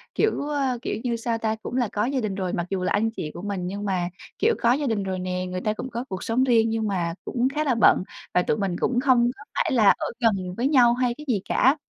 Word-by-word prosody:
kiểu, 430 Hz, -9 st, +1 dB
ơ, 275 Hz, -4 st, 0 dB
kiểu -, -, -2 dB
như, 240 Hz, -2 st, 0 dB
sao 230 Hz, 0 st, -2 dB
ta, 220 Hz, -1 st, -1 dB
cũng 220 Hz, +2 st, -7 dB
là 245 Hz, -4 st, +2 dB
có 210 Hz, +1 st, 0 dB
gia 270 Hz, +1 st, 0 dB
đình 215 Hz, -5 st, -2 dB
rồi, 185 Hz, -2 st, -2 dB
mặc 175 Hz, -, -1 dB
dù 190 Hz, -2 st, -2 dB
là -, -, 0 dB
anh 225 Hz, +2 st, +2 dB
chị 150 Hz, -9 st, -5 dB
của -, -, -8 dB
mình, 190 Hz, -3 st, -3 dB
nhưng 200 Hz, +2 st, -4 dB
mà, 180 Hz, -3 st, -1 dB, 0.3 s
kiểu, 460 Hz, +1 st, +3 dB
có 235 Hz, -, +4 dB
gia 285 Hz, 0 st, -1 dB
đình 210 Hz, -4 st, 0 dB
rồi 190 Hz, -1 st, -3 dB
nè, 180 Hz, 0 st, -2 dB
người 180 Hz, 0 st, -4 dB
ta 215 Hz, +2 st, 0 dB
cũng 255 Hz, +4 st, -6 dB
có 235 Hz, +1 st, -4 dB
cuộc 190 Hz, -2 st, -5 dB
sống 235 Hz, +3 st, +1 dB
riêng, 230 Hz, -3 st, +3 dB
nhưng 225 Hz, -1 st, -1 dB
mà 175 Hz, -4 st, -1 dB
cũng 245 Hz, 0 st, 0 dB
khá 305 Hz, -, +1 dB
là 270 Hz, -5 st, +1 dB
bận, 225 Hz, -, +5 dB, 0.3 s
và 180 Hz, -, +4 dB
tụi 225 Hz, -, 0 dB
mình 195 Hz, -4 st, -1 dB
cũng 245 Hz, -, +1 dB
hông 245 Hz, -2 st, +4 dB
có 285 Hz, -, -12 dB
phải -, -, +1 dB
là 215 Hz, -5 st, +5 dB
ở -, -, -3 dB
gần 195 Hz, -7 st, +1 dB
với 245 Hz, +3 st, +1 dB
nhau 245 Hz, -5 st, +5 dB
hay 245 Hz, 0 st, 0 dB
cái 300 Hz, -, -10 dB
gì 220 Hz, -7 st, +1 dB
cả. 265 Hz, +4 st, +4 dB
225 Hz, 280 wpm, -24 LUFS, 190-250 Hz, 0.3 s, bận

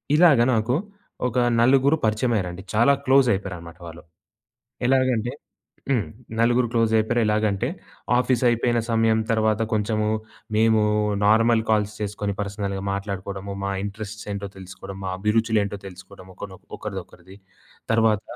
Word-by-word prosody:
ఇలాగ 155 Hz, -7 st, +6 dB
నాకు, 115 Hz, +3 st, +1 dB, 0.5 s
ఒక 125 Hz, +1 st, -3 dB, 0.2 s
నలుగురు 135 Hz, +5 st, +4 dB
పరిచయమయ్యారండి. 105 Hz, -5 st, -1 dB
చాలా 120 Hz, +6 st, +5 dB
క్లోజయిపోయారనమాట 95 Hz, -11 st, +1 dB
వాళ్ళు. 85 Hz, +1 st, -11 dB, 0.8 s
ఎలాగంటే 130 Hz, -3 st, +2 dB, 0.6 s
హ్మ్. 115 Hz, -9 st, +1 dB, 0.3 s
నలుగురు 120 Hz, +1 st, +3 dB
క్లోజయిపోయారు. 115 Hz, +1 st, +2 dB
ఎలాగంటే 105 Hz, +1 st, +1 dB, 0.5 s
ఆఫీసయిపోయిన 120 Hz, -1 st, +2 dB
సమయం 115 Hz, 0 st, +3 dB
తర్వాత 110 Hz, 0 st, +1 dB
కొంచెము 105 Hz, 0 st, 0 dB, 0.5 s
మేము 110 Hz, 0 st, +4 dB, 0.4 s
నార్మల్ 115 Hz, +2 st, +4 dB
కాల్స్ 105 Hz, -1 st, +1 dB
చేసుకొని 105 Hz, -1 st, -3 dB
పర్సనల్‌గా 100 Hz, -1 st, -3 dB
మాట్లాడుకోడము, 100 Hz, 0 st, -5 dB
మా 100 Hz, -, -1 dB
ఇంట్రెస్ట్స్ 105 Hz, +1 st, -7 dB
ఏంటో 100 Hz, 0 st, -4 dB
తెలుసుకోడం, 95 Hz, +1 st, -9 dB
మా 95 Hz, -, -3 dB
అభిరుచులు 110 Hz, +2 st, +1 dB
ఏంటో 100 Hz, 0 st, -4 dB
తెలుసుకోడము. 95 Hz, 0 st, -13 dB
ఒకనొ 95 Hz, -2 st, -9 dB, 0.2 s
ఒకరిదొకరిది. 95 Hz, +1 st, -8 dB, 0.5 s
తర్వాత, 110 Hz, -2 st, +3 dB
110 Hz, 110 wpm, -23 LUFS, 100-115 Hz, 0.8 s, ఇలాగ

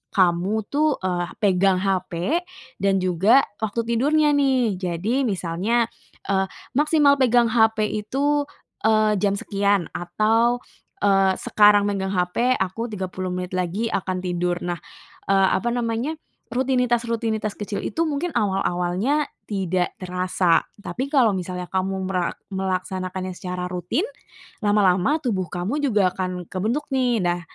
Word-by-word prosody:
kamu 185 Hz, +4 st, +2 dB
tuh, 300 Hz, 0 st, +2 dB
eee, 175 Hz, -1 st, -1 dB, 0.2 s
pegang 195 Hz, -1 st, +4 dB
hape 185 Hz, -, 0 dB, 0.4 s
dan 195 Hz, -1 st, +1 dB
juga 190 Hz, +9 st, +4 dB, 0.2 s
waktu 220 Hz, +1 st, -1 dB
tidurnya 290 Hz, +7 st, +2 dB
nih. 260 Hz, -8 st, +2 dB
Jadi 200 Hz, +9 st, -1 dB
misalnya, 200 Hz, +5 st, 0 dB, 0.4 s
eee, 190 Hz, -1 st, +2 dB, 0.2 s
maksimal 290 Hz, +1 st, +3 dB
pegang 240 Hz, -2 st, +4 dB
hape 220 Hz, -2 st, +3 dB
itu, 280 Hz, +8 st, 0 dB, 0.4 s
eee, 215 Hz, -2 st, +3 dB
jam 200 Hz, 0 st, +1 dB
sekian 200 Hz, -2 st, 0 dB
atau, 225 Hz, +7 st, +1 dB, 0.4 s
eee, 195 Hz, -1 st, +4 dB
sekarang 205 Hz, -1 st, +4 dB
megang 195 Hz, -1 st, -1 dB
hape, 205 Hz, +8 st, +1 dB
aku 190 Hz, +4 st, -2 dB
30 185 Hz, -3 st, -4 dB
menit 180 Hz, 0 st, -4 dB
lagi 185 Hz, +5 st, -1 dB
akan 185 Hz, -1 st, -2 dB
tidur. 175 Hz, -1 st, -1 dB
Nah, 175 Hz, -1 st, -3 dB, 0.5 s
eee, 195 Hz, -1 st, +4 dB
apa 235 Hz, -, -4 dB
namanya, 240 Hz, +6 st, -1 dB, 0.3 s
rutinitas-rutinitas 235 Hz, -4 st, 0 dB
kecil 205 Hz, -1 st, -3 dB
itu 330 Hz, -, -1 dB
mungkin 300 Hz, +3 st, -2 dB
awal-awalnya 195 Hz, -, 0 dB, 0.2 s
tidak 185 Hz, -3 st, -1 dB
terasa. 180 Hz, -1 st, +1 dB, 0.2 s
Tapi 255 Hz, +6 st, -4 dB
kalau 255 Hz, -8 st, +4 dB
misalnya 180 Hz, 0 st, -4 dB
kamu 190 Hz, +1 st, -2 dB
mera 180 Hz, -2 st, 0 dB, 0.2 s
melaksanakannya 185 Hz, 0 st, -3 dB
secara 180 Hz, 0 st, -4 dB
rutin, 180 Hz, -, -2 dB, 0.6 s
lama-lama 205 Hz, -, +3 dB
tubuh 200 Hz, -, -2 dB
kamu 195 Hz, -, -2 dB
juga 205 Hz, -9 st, +2 dB
akan 180 Hz, -1 st, -4 dB
kebentuk 225 Hz, +10 st, -2 dB
nih. 250 Hz, -3 st, +2 dB
Nah, 175 Hz, 0 st, 0 dB
200 Hz, 125 wpm, -23 LUFS, 185-240 Hz, 0.6 s, pegang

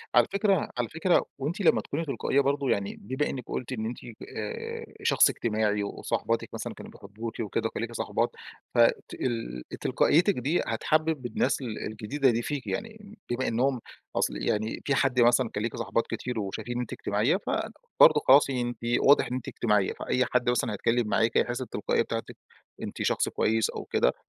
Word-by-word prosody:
على 120 Hz, -1 st, +6 dB
فكرة 200 Hz, -3 st, +2 dB
على 120 Hz, -2 st, -1 dB
فكرة 165 Hz, +3 st, +2 dB
وأنتِ 165 Hz, +10 st, -2 dB
لمَّا 175 Hz, -, +4 dB
تكوني 160 Hz, +3 st, -3 dB
تلقائية 140 Hz, +1 st, +1 dB
برضه 140 Hz, 0 st, 0 dB
يعني 100 Hz, 0 st, 0 dB
بما 130 Hz, +7 st, -1 dB
إنِّك 130 Hz, -3 st, -4 dB
قلتِ 130 Hz, +1 st, -4 dB
إن 110 Hz, -3 st, -3 dB
أنتِ 120 Hz, +2 st, -4 dB, 0.4 s
آآ، 105 Hz, -1 st, -5 dB, 0.2 s
شخص -, -, +5 dB
اجتماعي 105 Hz, -2 st, 0 dB
وصاحباتك -, -, -2 dB
مثلًا -, -, -5 dB
كانوا -, -, -11 dB
بيحبوكِي 110 Hz, +3 st, -6 dB
وكده، 110 Hz, +2 st, -1 dB
وكان 110 Hz, -, -5 dB
ليكِ 115 Hz, 0 st, -3 dB
صاحبات، -, -, 0 dB, 0.5 s
ف -, -, -1 dB, 0.3 s
تال 115 Hz, -, -3 dB, 0.2 s
تلقائيتك 180 Hz, +6 st, +3 dB
دي، 145 Hz, +8 st, +1 dB
هتحبّب 155 Hz, +4 st, 0 dB
الناس 120 Hz, -, 0 dB
ال 115 Hz, -4 st, -5 dB
الجديدة 110 Hz, +6 st, 0 dB
دي 115 Hz, +1 st, 0 dB
فيكِ، 145 Hz, +1 st, -4 dB
يعني 215 Hz, -1 st, -6 dB
بما 125 Hz, +2 st, -1 dB
إنِّهم 125 Hz, +1 st, +1 dB, 0.3 s
أصل -, -, 0 dB
يعني 110 Hz, +1 st, -1 dB
في 140 Hz, -, +2 dB
حد 130 Hz, -1 st, +2 dB
مثلًا 120 Hz, 0 st, +4 dB
كان 105 Hz, -, -3 dB
ليكِ 115 Hz, -, -2 dB
صاحبات 115 Hz, -, -1 dB
كتير 125 Hz, -2 st, -3 dB
وشايفين 105 Hz, +4 st, -4 dB
ان 125 Hz, -, -1 dB
أنتِ 120 Hz, -, -5 dB
اجتماعيَّة -, -, +1 dB
فبرضه -, -, +3 dB
خلاص 140 Hz, +1 st, +7 dB
أنتِ 120 Hz, -3 st, -2 dB, 0.2 s
واضح 140 Hz, +1 st, +5 dB
إن 125 Hz, -, -5 dB
أنتِ 130 Hz, -, -5 dB
اجتماعيّة، 105 Hz, -4 st, +1 dB
فأي 130 Hz, 0 st, 0 dB
حد 125 Hz, -1 st, +1 dB
مثلًا 115 Hz, -3 st, +1 dB
هيتكلم 115 Hz, +2 st, +1 dB
معاكِ 115 Hz, +2 st, +2 dB
هيحس 120 Hz, +1 st, +1 dB
بالتلقائية 125 Hz, -, 0 dB
بتاعتك، -, -, -4 dB, 0.4 s
أنتِ -, -, -5 dB
شخص -, -, +1 dB
كويس 110 Hz, 0 st, +1 dB
أو -, -, -6 dB
كده -, -, +2 dB
120 Hz, 180 wpm, -28 LUFS, 110-140 Hz, 0.5 s, خلاص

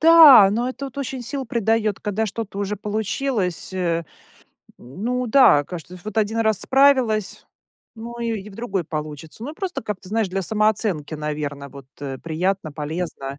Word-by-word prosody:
Да, 315 Hz, -11 st, +9 dB
ну 235 Hz, +4 st, 0 dB
это 275 Hz, +2 st, -5 dB
вот 275 Hz, +1 st, -9 dB
очень 265 Hz, -2 st, -4 dB
сил 270 Hz, +2 st, -4 dB
придает, 225 Hz, -2 st, 0 dB
когда 210 Hz, +2 st, -1 dB
что-то 205 Hz, -1 st, -5 dB
уже 205 Hz, +1 st, -2 dB
получилось, 210 Hz, -, -2 dB
э. 170 Hz, -3 st, -1 dB, 0.7 s
Ну 230 Hz, -, -3 dB
да, 225 Hz, -, +6 dB
кажется, 175 Hz, +2 st, -8 dB
вот 215 Hz, +1 st, -3 dB
1 220 Hz, +1 st, 0 dB
раз 220 Hz, -3 st, +2 dB
справилась, 260 Hz, -7 st, +2 dB, 0.5 s
ну 235 Hz, +1 st, -8 dB
и 230 Hz, -3 st, -2 dB
и 210 Hz, -, -11 dB
в 195 Hz, -, -14 dB
другой 200 Hz, -6 st, -2 dB
получится. 155 Hz, +5 st, -7 dB
Ну 295 Hz, -, -5 dB
и -, -, -15 dB
просто 370 Hz, -, -4 dB
как-то, 200 Hz, -3 st, -6 dB
знаешь, 220 Hz, -2 st, 0 dB
для 190 Hz, +1 st, -2 dB
самооценки, 210 Hz, -7 st, 0 dB
наверное, 150 Hz, -2 st, -4 dB
вот, 135 Hz, -1 st, -12 dB
э, 135 Hz, -2 st, -5 dB
приятно, 165 Hz, 0 st, -2 dB
полезно, 150 Hz, -2 st, -5 dB
210 Hz, 165 wpm, -22 LUFS, 165-230 Hz, 0.7 s, Да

